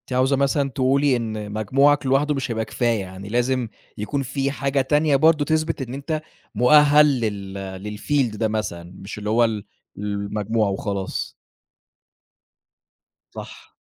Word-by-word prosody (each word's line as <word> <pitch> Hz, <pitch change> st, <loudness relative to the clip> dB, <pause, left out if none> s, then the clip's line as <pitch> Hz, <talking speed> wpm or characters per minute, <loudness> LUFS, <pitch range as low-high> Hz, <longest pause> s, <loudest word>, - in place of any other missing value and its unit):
أنتِ 130 Hz, -, -5 dB
عاوزة 130 Hz, +2 st, +3 dB
مثلًا 140 Hz, +1 st, +1 dB
تقولي 135 Hz, +2 st, +2 dB
إن 110 Hz, -3 st, -4 dB
مجموعك 135 Hz, +8 st, +2 dB
لوحده 135 Hz, +3 st, +2 dB
مش 135 Hz, -3 st, -3 dB
هيبقى 110 Hz, -1 st, -2 dB
كفاية، 115 Hz, 0 st, 0 dB
يعني 95 Hz, +1 st, -9 dB
لازم 120 Hz, +1 st, 0 dB, 0.3 s
يكون 120 Hz, +7 st, -2 dB
في 135 Hz, +1 st, -2 dB
حاجة 140 Hz, 0 st, 0 dB
تانية 150 Hz, +2 st, +2 dB
برضه 155 Hz, +1 st, +4 dB
تثبِت 155 Hz, 0 st, 0 dB
إن 125 Hz, -1 st, -5 dB
أنت 155 Hz, +3 st, -3 dB, 0.3 s
مؤهَّل 150 Hz, +5 st, +6 dB, 0.2 s
لل 100 Hz, -1 st, -5 dB
للfield 125 Hz, -3 st, 0 dB
ده 110 Hz, -, +1 dB
مثلًا، 90 Hz, -6 st, -4 dB
مش 95 Hz, +2 st, -9 dB
اللي 105 Hz, 0 st, -4 dB
هو 115 Hz, +2 st, +4 dB
ال 110 Hz, -2 st, -1 dB, 0.3 s
المجموع 105 Hz, +1 st, -1 dB
وخلاص. 100 Hz, 0 st, -3 dB, 2.0 s
صح. -, -, -10 dB
120 Hz, 140 wpm, -22 LUFS, 105-140 Hz, 2.0 s, مؤهَّل